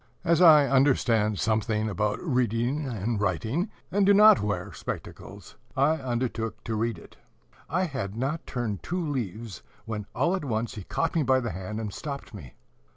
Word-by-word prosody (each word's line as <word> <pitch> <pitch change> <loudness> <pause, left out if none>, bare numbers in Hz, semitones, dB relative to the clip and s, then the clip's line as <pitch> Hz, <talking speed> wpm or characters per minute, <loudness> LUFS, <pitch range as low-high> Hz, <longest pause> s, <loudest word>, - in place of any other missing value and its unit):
As 170 +1 +3
I 155 -5 +8
understand 120 -6 +3
something 110 0 0
about 105 0 -1
reading 125 - 0
and 110 -2 -2
writing, 110 - -1 0.2
and 200 +1 +2
do 200 +1 +5
not 210 - +7
wear 100 -2 -3
spectacles, - - -8 0.2
I 150 +4 +3
undertook 120 -4 -3
to 115 - -3
read 115 0 -1
it. - - -15 0.5
I 180 +5 +1
had 125 - -4
not 140 +6 -2
turned 115 -7 -3
two 175 -2 -3
leaves, 115 - -4 0.2
when 105 -3 -5
all 175 +2 +2
at 185 - -4
once 115 -3 -2
he 105 -4 -8
caught 165 - -1
me 165 - +2
by 130 -2 +3
the 120 -3 -3
hand, 95 +4 -5
and 105 -3 -4
stopped 140 -5 -6
me. 80 - -10
120 Hz, 170 wpm, -27 LUFS, 105-145 Hz, 0.5 s, I